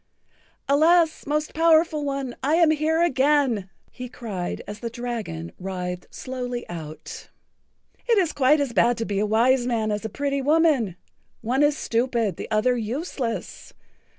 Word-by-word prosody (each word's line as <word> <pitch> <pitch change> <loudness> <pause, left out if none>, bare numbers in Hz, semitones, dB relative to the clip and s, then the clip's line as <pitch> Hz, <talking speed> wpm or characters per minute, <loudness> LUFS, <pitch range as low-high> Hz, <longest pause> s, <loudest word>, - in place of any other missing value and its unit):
"Alas, 320 +3 +3
Most 300 +1 -1
Powerful 320 -1 +3
One, 275 -3 -3
I 295 +4 +2
am 335 -2 +5
here 315 +2 +1
again," 270 - +2 0.2
he 250 -1 -8
cried, 200 -8 -5
as 210 +1 -7
the 235 - -4
dragon 225 - -5
writhed[Pg 180 -1 -4
68] - - -16
slowly 250 -1 -5
out. 160 -3 -8 0.8
"It 460 - +5
is 360 -5 +2
quite 290 +2 +4
as 280 -4 -1
bad 240 0 +3
to 225 - -2
be 200 -2 -2
a 210 - +1
wise 240 +3 +3
man 225 -3 0
as 210 +1 -2
a 220 - -3
pretty 280 +1 -2
woman—one 265 - 0
is 295 0 +3
stupid, 230 -5 0
the - - -7
other 225 +4 +2
useless. 240 +1 -4
250 Hz, 150 wpm, -24 LUFS, 220-295 Hz, 0.8 s, am